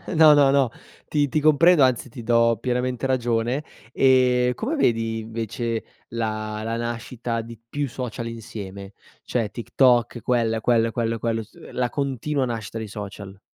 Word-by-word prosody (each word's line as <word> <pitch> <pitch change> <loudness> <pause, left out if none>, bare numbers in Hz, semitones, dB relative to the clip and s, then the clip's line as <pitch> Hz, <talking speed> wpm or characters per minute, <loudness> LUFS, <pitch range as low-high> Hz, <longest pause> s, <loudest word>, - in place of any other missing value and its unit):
No, 155 -1 +8
no, 140 -2 +5
no. 135 -3 +3 0.4
Ti 145 -1 +2
ti - - -5
ti 155 - +1
comprendo 155 +1 +5
anzi 130 -1 +1
ti 120 0 -9
do 115 0 +3
pienamente 125 0 -1
ragione. 120 +1 0 0.3
Ehm, 125 -2 +4
come 275 +9 -2
vedi 115 - +1
invece 115 +1 -3 0.3
la 110 -2 -3
la 115 +1 -2
nascita 115 0 -3
di 115 -1 -11
più 145 +1 -2
social 120 -1 -5
insieme, 100 -3 -8 0.3
cioè 115 -4 -2
TikTok, 120 0 +2
quella 115 -2 +1
e 110 - -5
quello 115 -1 +3
e - - -4
quello 115 0 -1
e - - -4
quello, 115 -1 -1
su - - -19
uhm, - - -12
la 125 -1 0
continua 140 0 -1
nascita 115 -2 -5
dei 110 - -5
social? 100 -1 -8
115 Hz, 175 wpm, -23 LUFS, 115-130 Hz, 0.4 s, No